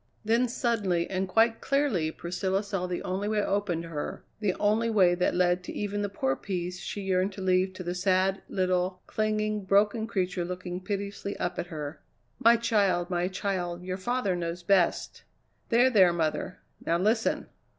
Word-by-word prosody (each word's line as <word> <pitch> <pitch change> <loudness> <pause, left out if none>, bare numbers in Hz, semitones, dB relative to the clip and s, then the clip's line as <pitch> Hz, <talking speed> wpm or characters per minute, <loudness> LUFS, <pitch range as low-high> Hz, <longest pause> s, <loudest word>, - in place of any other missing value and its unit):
Then 230 +3 +3
suddenly 210 -8 0
and 190 0 -1
quite 225 +4 +3
clearly 275 - +1
Priscilla 185 +4 -2
saw 195 -3 -3
the 180 -1 -3
only 190 +3 -2
way 215 -1 +1
open 195 -5 -1
to 165 - -8
her, 150 -3 -5 0.2
the 205 -4 0
only 215 +3 +2
way 190 -5 +4
that 180 +1 +1
led 180 0 +2
to - - -6
even 205 0 -2
the 205 - -1
poor 135 -9 0
peace 180 +1 -4
she 205 - -5
yearned 190 0 0
to 195 - -8
leave 185 0 +2
to 185 - -7
the 175 0 -2
sad, 185 +1 +1
little, 185 -1 0
clinging, 215 -1 -1
broken 205 +3 +2
creature 185 -4 -1
looking 180 0 -5
piteously 200 0 -4
up 175 0 -2
at - - -3
her. 150 -2 -6 0.4
"My 230 +1 +6
child, 200 -6 +1
my 175 0 +1
child, 180 -2 -3
your 185 0 -3
father 205 -1 0
knows 170 0 -4
best." 185 -1 +1 0.5
"There! 245 +2 +5
there 190 -6 +6
mother. 165 +2 -1 0.3
Now 170 - +1
listen!" 220 +5 +1
190 Hz, 175 wpm, -28 LUFS, 180-210 Hz, 0.5 s, My